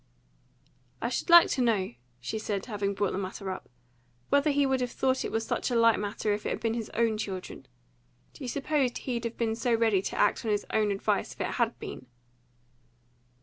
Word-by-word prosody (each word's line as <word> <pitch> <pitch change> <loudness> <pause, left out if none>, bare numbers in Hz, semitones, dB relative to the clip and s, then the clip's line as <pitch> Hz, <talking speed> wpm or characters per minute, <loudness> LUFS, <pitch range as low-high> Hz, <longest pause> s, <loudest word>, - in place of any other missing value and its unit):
"I 235 - -1
should 250 - -3
like 345 0 +9
to 260 - 0
know," 210 - +1 0.3
she 220 - -4
said, 205 -2 -3
having 200 -3 -2
brought 200 -1 0
the 190 - -2
matter 190 0 -4
up, 185 - -7 0.6
"whether 285 +2 +3
he 285 -1 +3
would 265 -1 +1
have 250 - -1
thought 260 +2 0
it - - -3
was 225 0 -1
such - - -1
a 245 - -1
light 230 -1 +5
matter 205 +1 -1
if 210 - -3
it - - -2
had - - -2
been 225 -1 0
his 230 -2 -4
own 225 -2 +1
children. 190 -4 -6 0.7
Do - - -11
you - - -4
suppose 275 -1 0
he'd 240 -2 -3
have 230 - -4
been 225 -1 0
so 235 +1 +1
ready 225 -4 +3
to - - -4
act 205 - +2
on 225 - -2
his 205 -1 0
own 215 -1 +2
advice 200 -1 0
if - - -9
it - - 0
HAD - - +1
been?" 130 - -8
225 Hz, 215 wpm, -29 LUFS, 205-245 Hz, 0.7 s, like